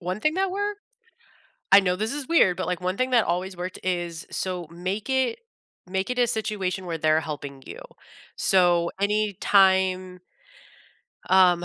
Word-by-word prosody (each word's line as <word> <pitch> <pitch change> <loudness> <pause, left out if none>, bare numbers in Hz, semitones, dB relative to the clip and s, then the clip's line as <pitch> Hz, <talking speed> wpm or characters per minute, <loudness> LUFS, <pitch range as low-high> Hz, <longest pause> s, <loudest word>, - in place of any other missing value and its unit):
One 185 +3 -4
thing 305 +5 +1
that 380 +1 0
worked 410 +1 -3 0.9
I 195 - +11
know 180 -2 0
this 215 +4 -2
is 285 -2 -5
weird, 190 - +4
but, - - -3
like, 180 -1 -2
one 185 +1 -2
thing 255 0 0
that 240 -3 +4
always 180 +2 -2
worked 180 +1 -6
is 175 -2 -3
so 180 -3 -4
make 185 +7 -5
it 260 -3 0 0.5
make 190 +4 -2
it 250 - -2
a 245 - +4
situation 195 -5 -2
where 165 -2 -3
they're 155 0 +2
helping 145 -3 -7
you. - - -9 0.6
So 175 -3 +3
anytime 190 -3 +2 1.1
um, 180 -2 +5
185 Hz, 160 wpm, -25 LUFS, 175-215 Hz, 1.1 s, I